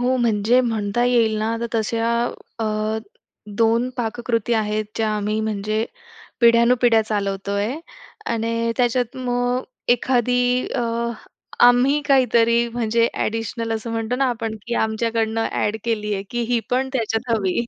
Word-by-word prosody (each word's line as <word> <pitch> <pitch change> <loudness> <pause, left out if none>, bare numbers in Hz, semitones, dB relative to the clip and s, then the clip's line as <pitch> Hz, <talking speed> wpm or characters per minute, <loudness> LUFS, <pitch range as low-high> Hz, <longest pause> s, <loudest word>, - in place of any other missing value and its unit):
हो, 255 +1 +2
म्हणजे 235 +1 +3
म्हणता 225 -1 0
येईल 230 -3 +3
ना, 225 +1 -1
तर 235 - -1
तशा 225 +1 0 0.5
अ, 215 0 -1 0.6
2 230 +2 +2
पाककृती 235 -1 -1
आहेत, 215 0 0
ज्या 220 -1 +1
आम्ही 210 +1 -1
म्हणजे 215 +1 -1 0.6
पिढ्यानुपिढ्या 235 -1 +5
चालवतो 200 -2 -2
आहे 235 +10 -2 0.5
आणि 230 0 -1
त्याच्यात 245 -1 0
मग 245 0 0
अ, - - -12 0.3
एखादी 245 0 +1
अ, - - 0 0.9
आम्ही 255 +4 +4
काहीतरी 235 -3 +4
म्हणजे 230 0 +1 0.2
एडिशनल 225 +1 -3
असं 225 +1 -4
म्हणतो 225 +2 -2
ना 270 - +1
आपण, 225 -2 -3
की 235 - -2
आमच्याकडनं 225 0 0
ॲड 210 +1 0
केली 210 -2 -1
आहे 195 - -3
की 240 - -2
ही 240 -1 +2
पण 260 +1 +1
त्याच्यात 230 -1 -1
हवी, 210 +1 0
230 Hz, 140 wpm, -21 LUFS, 220-245 Hz, 0.9 s, पिढ्यानुपिढ्या